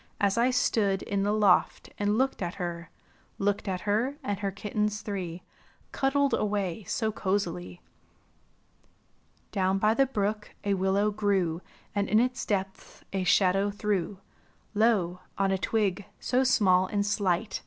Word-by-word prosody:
As 200 -1 +2
I 235 +2 +3
stood 215 -6 +1
in 200 -1 -1
the 205 +1 +1
loft 210 -3 +2
and 205 +1 +1
looked 265 -2 0
at 175 0 -3
her; 175 -2 -5 0.5
Looked 205 +1 -1
at 185 -1 -2
her 225 +7 0
and 205 -5 -2
her 200 -1 -1
kittens 210 +1 -2
three 180 -4 -5 0.5
Cuddled 280 +1 +1
away 205 -2 -1
so 220 +2 -1
cozily. 185 - -2 1.7
Down 190 0 +1
by 215 +2 +3
the 270 +3 +3
brook 210 -3 -2
a 200 -1 +1
willow 195 +2 +1
grew 195 -5 0 0.3
And 200 -1 -1
in 215 - +5
its 250 +2 -1
depths 195 -2 -3
a 190 -1 0
shadow 195 +2 +3
threw; 205 -2 -2 0.6
Lo, 205 -5 +2 0.2
on 195 0 +2
a 190 - +2
twig, 205 -2 0
so 255 +1 +1
small 185 -7 +4
and 200 +1 -1
slight. 205 -1 0
205 Hz, 145 wpm, -28 LUFS, 190-215 Hz, 1.7 s, in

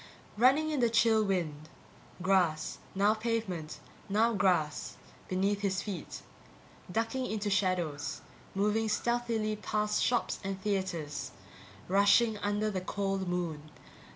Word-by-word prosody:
Running 270 +8 +4
in 295 - 0
the 240 -2 +3
chill 225 -1 +4
night 210 - 0
wind. 155 -5 -2 0.5
Grass, 180 -5 +1 0.2
now 200 +2 +4
pavement, 215 -8 -3 0.3
now 225 +4 +3
grass, 180 -7 +1 0.3
beneath 195 +2 0
his 195 -1 0
feet. 190 -7 -6 0.7
Ducking 230 +5 -1
into 210 -1 -2
shadows, 180 -7 0 0.3
moving 210 +3 +1
stealthily 225 -1 0
past 210 0 0
shops 245 -1 +1
and 195 0 -3
theatres, 190 -7 -2 0.6
rushing 200 +3 +4
under 205 +1 0
the 185 -2 -2
cold 195 0 -2
moon. 165 -4 -3
200 Hz, 120 wpm, -31 LUFS, 185-220 Hz, 0.7 s, Running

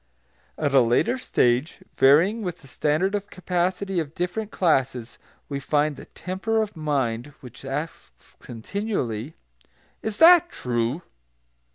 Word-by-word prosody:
At 145 -3 -1
a 135 - +7
later 125 - +2
stage, 125 - 0
varying 170 +12 +4
with 180 -5 -5
the - - -14
standard 155 +9 0
of 205 0 -3
capacity 185 +1 -1
of 155 -1 -5
different 190 +4 -3
classes, 130 - 0 0.3
we 140 -1 -4
find 145 +2 0
the - - -11
temper 190 +5 -3
of 215 -2 -2
mind 140 -4 -2
which 125 -2 -12
asks 135 - -7
continually, 125 - -4 0.7
"Is 220 -2 -4
that 345 +1 +7
true?" 120 - -2
155 Hz, 130 wpm, -24 LUFS, 130-195 Hz, 0.7 s, a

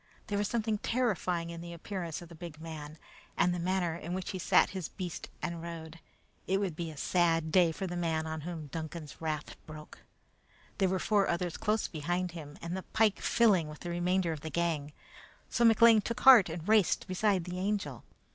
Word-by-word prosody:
There 205 - -2
was 205 - +1
something 220 -2 -1
terrifying 185 -9 0
in 170 0 -7
the 170 0 -7
appearance 170 -1 -5
of 170 - -13
the - - -11
big 165 -2 -9
man, 155 -1 -8 0.4
and 180 - +3
the 175 - -3
manner 180 -1 0
in 170 +1 -5
which 185 -1 -4
he 190 - -5
sat - - +4
his 190 -4 -4
beast 180 -3 -6
and 170 -1 -3
rode. 165 -1 -8 0.5
It 195 +1 +2
would 190 -6 -2
be 170 0 -4
a 155 - -10
sad 165 0 +1
day 175 -2 +5
for 190 +4 -4
the 175 -1 -4
man 165 -2 -1
on 160 0 -4
whom 165 -1 -6
Duncan's 155 0 -7
wrath 155 -2 -3
broke. 155 -1 -10 0.8
There 190 -2 +3
were 190 - +1
four 200 +1 +2
others 170 0 -1
close 215 +1 0
behind 175 +3 -2
him, 150 -3 -9
and 170 +2 -3
the 190 - -3
pike 220 +1 +1
filling 200 -9 +3
with 150 0 -10
the 175 - -4
remainder 175 0 +1
of 155 -2 -5
the 160 - -5
gang; 160 -4 -1 0.6
so 235 - +1
McLean 230 -1 +7
took 235 +4 -4
heart 245 -9 +9
and 165 +2 -6
raced 215 -5 +3
beside 190 0 +1
the 180 +1 -5
Angel. 185 - -2
175 Hz, 205 wpm, -31 LUFS, 160-190 Hz, 0.8 s, heart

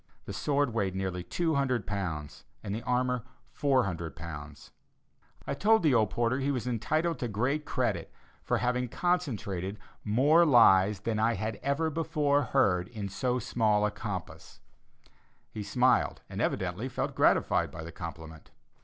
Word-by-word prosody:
The - - -6
sword 140 -4 0
weighed 100 -4 -1
nearly 95 -2 -3
200 135 - 0
pounds, 85 -8 -4 0.2
and 100 - -4
the 110 - -3
armor 125 -1 0 0.3
400 100 - 0
pounds. 75 -4 -9 0.7
I - - -2
told 220 -1 +3
the 150 -4 +4
old 110 -4 +3
porter 120 +5 0
he 135 +1 0
was 125 -6 -1
entitled 155 +8 0
to 120 - -2
great 125 +8 -1
credit - - -1 0.3
for - - 0
having 125 0 0
concentrated 110 - -1 0.3
more 140 +10 +4
lies 105 - +5
than 110 0 -1
I 115 +1 +2
had 110 -1 -3
ever 150 +4 0
before 145 -2 +1
heard 90 -5 +2
in 105 -4 -6
so 125 +6 -1
small 110 -3 +1
a 105 - 0
compass. 95 -6 -7 0.9
He 110 - -6
smiled, 125 +5 +2
and - - -5
evidently - - -1
felt - - -3
gratified - - +3
by 80 - -8
the 85 - -8
compliment. 80 -2 -9
115 Hz, 150 wpm, -29 LUFS, 95-135 Hz, 0.9 s, lies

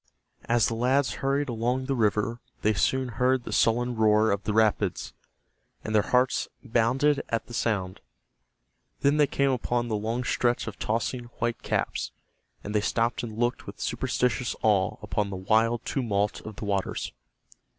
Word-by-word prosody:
As 115 -2 +3
the 115 - 0
lads 130 +4 +2
hurried 140 +2 +1
along 125 +2 -1
the 135 - 0
river 110 0 +1 0.2
they 110 - +3
soon 130 +5 +1
heard 125 +2 +1
the - - -6
sullen 120 +2 +2
roar 110 0 +4
of 100 0 -2
the 105 - 0
rapids, 105 -3 +1 0.7
and 110 - -4
their 105 - +5
hearts 125 +4 +1 0.2
bounded 130 +4 +2
at 115 -1 -1
the 120 - -12
sound. 95 -6 -1 1.0
Then 140 +2 +3
they 150 -1 +5
came 140 0 +1
upon 120 -1 -1
the 110 - 0
long 115 +4 -2
stretch 120 0 +1
of 115 - -7
tossing 115 +2 -1
white 115 0 -1
caps, - - -1 0.5
and 105 - -5
they 105 - +2
stopped 115 +2 0
and 110 -3 -6
looked 120 +1 -1
with - - -9
superstitious 125 0 -1
awe 100 -4 +2
upon 105 -1 -1
the 100 - -5
wild 110 +4 +2
tumult 105 -6 -1
of 110 - -7
the 105 - -6
waters. 100 -2 -2
115 Hz, 165 wpm, -27 LUFS, 105-125 Hz, 1.0 s, their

